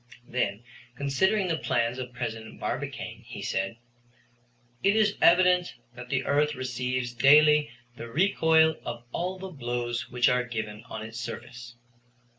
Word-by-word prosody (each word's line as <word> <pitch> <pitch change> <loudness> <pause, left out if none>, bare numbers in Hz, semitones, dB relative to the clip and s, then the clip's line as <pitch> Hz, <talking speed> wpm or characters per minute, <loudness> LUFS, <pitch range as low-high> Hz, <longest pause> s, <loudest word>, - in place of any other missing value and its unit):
Then, 105 -3 -2 0.3
considering 185 +10 +1
the 165 -2 -1
plans 120 +1 0
of 125 -1 -5
President 115 -3 -6
Barbicane, - - -4
he - - -8
said: 95 +4 -2 1.0
"It 200 +2 +3
is 215 -2 +3
evident 180 -1 +4 0.2
that 125 0 -10
the 130 -1 0
earth 150 +1 +2
receives 125 -1 -2
daily 150 +4 +6 0.3
the 115 - -7
recoil 160 0 +3
of 120 0 -6
all 180 +6 -3
the 190 0 -7
blows 120 -4 -3
which 125 0 +2
are 125 0 +2
given 110 -3 -5
on 110 -1 -7
its 115 +1 -7
surface. 120 0 -8
125 Hz, 140 wpm, -27 LUFS, 120-160 Hz, 1.0 s, daily